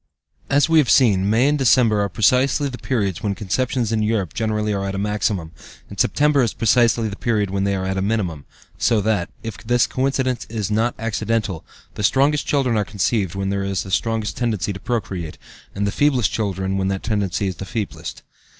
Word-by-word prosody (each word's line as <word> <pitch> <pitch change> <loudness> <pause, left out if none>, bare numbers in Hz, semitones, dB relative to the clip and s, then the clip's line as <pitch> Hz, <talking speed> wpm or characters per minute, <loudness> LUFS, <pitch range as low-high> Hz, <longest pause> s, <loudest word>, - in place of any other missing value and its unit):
As 145 +1 +3
we 165 -1 +5
have 145 - +2
seen, 100 -7 +4
May 115 +5 +3
and 150 0 +1
December 115 -5 +4
are 100 - 0
precisely 130 - +2
the 125 -3 -7
periods 100 -8 -1
when 100 -2 -1
conceptions 115 +3 -1
in 110 -1 +1
Europe 105 -5 -1
generally 105 -1 -1
are 100 -1 -2
at 95 - -3
a - - -3
maximum, 100 -4 -1 0.4
and - - -10
September 150 -1 +3
is 115 -4 0
precisely 115 0 +3
the 100 - -5
period 105 -3 0
when 100 0 0
they 100 0 +1
are 95 -1 -3
at 95 0 -1
a - - -1
minimum, 95 -8 -2 0.3
so 115 -2 +3
that, 105 -4 0
if 115 -2 -6
this 120 +2 +2
coincidence 130 -1 -1
is 110 -2 -3
not 115 +3 +1
accidental, 110 -4 -2 0.3
the - - -6
strongest 140 +7 +2
children 130 -5 +1
are 105 - +2
conceived 100 -2 -1
when 95 0 -2
there 100 0 -1
is 100 -1 -2
the 95 - -9
strongest 110 +2 -1
tendency 105 -6 -1
to 95 - -8
procreate, 95 -9 -4 0.4
and 100 +1 -1
the 100 - 0
feeblest 130 -4 +2
children 95 -2 -2
when 95 - 0
that 95 0 -2
tendency 100 -3 -1
is 95 - -1
feeblest. 105 +1 -5
105 Hz, 200 wpm, -21 LUFS, 95-120 Hz, 0.4 s, we